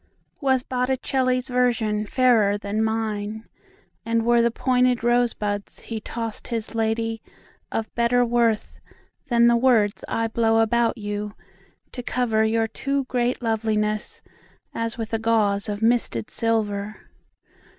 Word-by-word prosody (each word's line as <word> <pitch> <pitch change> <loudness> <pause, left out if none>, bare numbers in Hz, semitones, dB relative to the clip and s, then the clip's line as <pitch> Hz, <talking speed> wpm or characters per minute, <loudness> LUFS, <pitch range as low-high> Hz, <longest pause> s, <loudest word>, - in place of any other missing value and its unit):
Was 265 -3 +2
Botticelli's 255 0 0
visionFairer 225 -2 +2
than 205 +2 -1
mine; 220 -1 -2 0.6
And 230 0 0
were 240 0 +4
the 235 - +3
pointed 250 0 +1
rosebudsHe 225 -2 -1
tossed 230 -2 -5
his 230 -3 -3
ladyOf 225 0 -1 0.7
better 245 +1 +2
worthThan 235 +1 0
the 235 - +5
words 230 -4 +2
I 230 - -1
blow 225 0 +2
about 230 +1 +2
youTo 205 -1 -4 0.7
cover 230 -3 +1
your 225 0 +1
too 275 +4 -2
great 250 -1 -1
lovelinessAs 220 +1 -3
with 225 -1 -5
a 225 - +1
gauzeOf 210 -2 +1
misted 225 - +1
silver? 215 -2 -1
225 Hz, 105 wpm, -23 LUFS, 215-240 Hz, 0.7 s, the